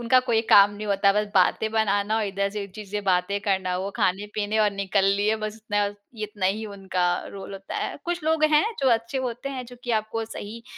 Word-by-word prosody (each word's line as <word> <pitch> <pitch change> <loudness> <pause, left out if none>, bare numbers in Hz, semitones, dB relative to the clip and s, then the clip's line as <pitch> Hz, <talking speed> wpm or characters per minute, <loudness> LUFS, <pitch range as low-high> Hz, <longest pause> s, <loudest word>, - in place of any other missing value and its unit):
उनका 240 +2 +4
कोई 235 -3 +1
काम 200 0 +8
नहीं 210 +1 -6
होता। 200 0 +3
बस 210 +1 +1
बातें 195 +3 +3
बनाना 210 -1 +1
और 220 - +1
इधर 200 0 -1
से 205 0 -4
एक 200 - -8
चीज़ 210 -3 -9
से 210 0 -2
बातें 190 0 +1
करना 190 -3 0
वो 195 +2 -3
ख़ाने-पीने 205 +3 0
और 210 -1 +4
निकल 200 0 0
लिए 210 +2 +1
बस 215 0 -5
इतना 205 -2 -1 0.4
इतना 205 -2 -2
ही 210 +4 -1
उनका 190 -3 -2 0.3
रोल 195 0 -8
होता 195 0 -7
है। - - -3
कुछ 345 -1 -2
लोग 315 -1 +2
हैं 300 +3 +5 0.2
जो 270 - +3
अच्छे 230 +3 0
होते 250 +1 -3
हैं 260 -2 -5
जो 245 +1 -12
कि 245 - -3
आपको 225 +1 -4
सही 220 +1 -8
210 Hz, 225 wpm, -25 LUFS, 200-225 Hz, 0.4 s, काम